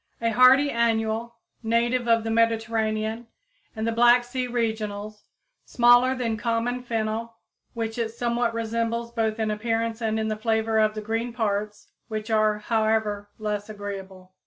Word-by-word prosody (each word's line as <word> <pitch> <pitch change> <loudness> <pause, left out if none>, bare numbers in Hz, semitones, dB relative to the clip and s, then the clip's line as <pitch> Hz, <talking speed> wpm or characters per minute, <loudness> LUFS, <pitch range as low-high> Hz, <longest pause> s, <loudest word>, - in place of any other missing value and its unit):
a 230 0 0
hardy 260 +4 +6
annual, 230 0 0 0.3
native 235 +2 +1
of 230 -1 +3
the 225 - -2
Mediterranean 225 0 0 0.5
and 220 0 -3
the 230 - +1
Black 240 +1 +5
Sea 250 +1 -3
regions, 215 -3 -3 0.4
smaller 245 +2 +4
than 230 -3 -2
common 235 +2 -1
fennel, 225 -1 -3 0.4
which 225 0 -3
it 230 -1 0
somewhat 235 0 -1
resembles 230 +1 -2
both 225 -2 -1
in 220 -1 -1
appearance 225 +1 -2
and 220 -1 0
in 220 - -1
the 215 - -1
flavor 220 0 0
of 215 0 +2
the 215 - -4
green 225 +3 -2
parts, 210 -2 -3 0.2
which 215 0 -5
are, 215 -1 +3
however, 215 -2 0
less 210 -1 -3
agreeable. 195 -3 -8
225 Hz, 150 wpm, -25 LUFS, 215-235 Hz, 0.5 s, hardy